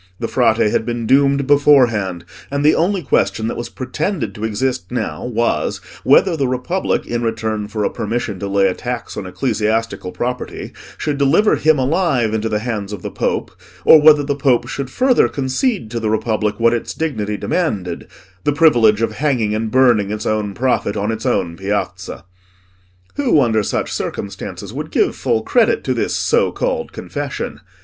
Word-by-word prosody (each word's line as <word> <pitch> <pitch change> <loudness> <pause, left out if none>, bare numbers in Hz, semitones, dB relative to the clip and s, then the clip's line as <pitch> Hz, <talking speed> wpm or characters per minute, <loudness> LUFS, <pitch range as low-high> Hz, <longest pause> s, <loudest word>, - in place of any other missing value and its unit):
The 115 - -2
Frate 115 -3 +2
had 105 -1 +2
been 120 0 -3
doomed 140 +2 +3
beforehand, 120 -11 +3 0.2
and 140 +1 -1
the 155 - +6
only 185 +2 +1
question 100 -4 +1
that - - -3
was 120 0 -5
pretended 150 +8 -3
to 105 - -8
exist 110 -1 -2
now 125 - -3
was, 120 -1 -1 0.3
whether 185 -4 +4
the 140 -4 0
Republic, 130 +9 -1
in 120 0 -2
return 110 -2 -2
for 105 0 -3
a - - +1
permission 115 -3 -3
to 100 - -4
lay 100 0 +2
a 95 - 0
tax 120 0 -5
on 100 -3 -5
ecclesiastical 110 -2 -1
property, 125 +4 -4 0.3
should 145 -2 -2
deliver 160 +10 +4
him 155 0 +3
alive 135 - +1
into 110 0 -1
the 105 - 0
hands 105 -4 -3
of 105 - -7
the - - -5
Pope, - - -2 0.3
or 155 - +8
whether 150 -1 +6
the 140 0 -1
Pope 135 -4 +2
should 140 -2 -4
further 255 - +3
concede 135 - -1
to 115 - -2
the 110 -1 -1
Republic 110 -1 -1
what 115 0 +4
its 120 - -3
dignity 110 -10 -2
demanded—the 95 - -3
privilege 120 -9 +4
of 115 - 0
hanging 120 -3 0
and 110 +1 -2
burning 120 -5 +3
its 105 0 -4
own 105 -2 -1
prophet 120 -5 0
on 105 +2 -1
its 110 0 -4
own 85 -1 0
piazza. 95 -1 -4 0.9
Who, 265 - +3
under 115 -5 +2
such - - -2
circumstances, 100 - -5
would - - -5
give - - +1
full 110 - 0
credit 240 - +2
to - - 0
this - - -1
so 470 +1 +2
called - - -2
confession? - - -5
120 Hz, 175 wpm, -18 LUFS, 105-140 Hz, 0.9 s, or